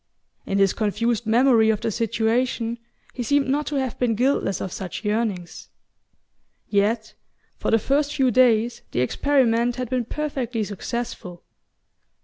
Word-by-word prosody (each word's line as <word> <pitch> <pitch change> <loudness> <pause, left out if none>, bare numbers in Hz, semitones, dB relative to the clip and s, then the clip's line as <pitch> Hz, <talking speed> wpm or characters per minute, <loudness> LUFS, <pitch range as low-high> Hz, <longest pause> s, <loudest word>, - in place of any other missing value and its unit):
In 195 - 0
his 195 -1 +3
confused 225 +1 -1
memory 230 -1 +4
of 215 -2 +1
the 225 - -1
situation 230 +1 0 0.3
he 250 - -5
seemed 285 +3 +1
not 290 +3 0
to 295 - -3
have 265 -3 -2
been 240 -3 +1
guiltless 245 -5 +1
of 190 - -4
such 190 +3 -6
yearnings...Yet 210 +1 -4 0.5
for - - -1
the 225 - +5
first 285 +6 0
few 265 -3 +3
days 235 -1 +3
the 125 - +1
experiment 240 - +2
had 250 -2 -5
been 250 -2 0
perfectly 255 -5 -3
successful. 205 -3 -5
230 Hz, 135 wpm, -23 LUFS, 215-255 Hz, 0.5 s, the